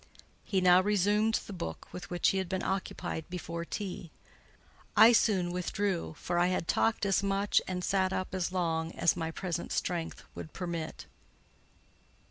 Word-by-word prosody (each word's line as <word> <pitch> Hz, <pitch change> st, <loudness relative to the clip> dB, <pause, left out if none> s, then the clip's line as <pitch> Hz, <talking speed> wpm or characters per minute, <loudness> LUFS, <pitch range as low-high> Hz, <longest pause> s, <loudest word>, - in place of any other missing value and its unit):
He 190 Hz, -2 st, 0 dB
now 180 Hz, 0 st, +7 dB
resumed 210 Hz, +2 st, +2 dB
the 205 Hz, -, -8 dB
book 80 Hz, -, -6 dB
with 180 Hz, -, -8 dB
which 175 Hz, -1 st, +2 dB
he 195 Hz, -, +1 dB
had 190 Hz, -2 st, -3 dB
been 190 Hz, 0 st, -2 dB
occupied 185 Hz, -4 st, -3 dB
before 170 Hz, -1 st, -4 dB
tea. 180 Hz, -1 st, -5 dB, 0.9 s
I 220 Hz, +3 st, +9 dB
soon 195 Hz, -6 st, +3 dB
withdrew, 180 Hz, -1 st, -2 dB
for 175 Hz, -, -1 dB
I 175 Hz, -, +4 dB
had 180 Hz, -2 st, -1 dB
talked 225 Hz, -2 st, +2 dB
as 195 Hz, -1 st, +2 dB
much, 200 Hz, 0 st, +2 dB
and 180 Hz, -1 st, -3 dB
sat 190 Hz, -1 st, +1 dB
up 185 Hz, 0 st, -3 dB
as 185 Hz, -1 st, -1 dB
long, 165 Hz, -2 st, -1 dB
as 170 Hz, -, +2 dB
my 165 Hz, -2 st, -2 dB
present 170 Hz, 0 st, -4 dB
strength 170 Hz, -2 st, -2 dB
would 160 Hz, -, -8 dB
permit. 170 Hz, -3 st, -5 dB
180 Hz, 160 wpm, -31 LUFS, 170-195 Hz, 0.9 s, I